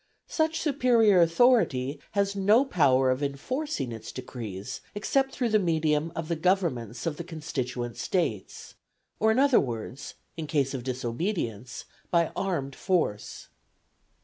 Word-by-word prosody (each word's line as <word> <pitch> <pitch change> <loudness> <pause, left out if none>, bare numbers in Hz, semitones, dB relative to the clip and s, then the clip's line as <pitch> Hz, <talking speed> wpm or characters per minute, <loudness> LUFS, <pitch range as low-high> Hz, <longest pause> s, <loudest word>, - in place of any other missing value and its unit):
Such 320 0 0
superior 240 - +4
authority 165 - +3
has 200 0 +1
no 210 +7 +4
power 135 - +3
of 130 +2 -1
enforcing 145 - -3
its 110 -1 -7
decrees 120 -3 -7
except 270 +6 +1
through 245 -4 -1
the 215 0 +4
medium 160 -3 +1
of 165 -1 -4
the 170 - -1
governments 160 - 0
of 160 -3 -2
the 170 - -5
constituent 130 -7 -4
States; 140 - -2 0.5
or, 220 - +3
in 220 - +1
other 275 -2 +5
words, 120 +1 -5 0.2
in 160 -2 -5
case 140 -3 0
of 130 -3 -4
disobedience, 125 - -3 0.2
by 170 -2 +2
armed 145 -9 -2
force. 160 - -2
160 Hz, 135 wpm, -27 LUFS, 130-200 Hz, 0.5 s, other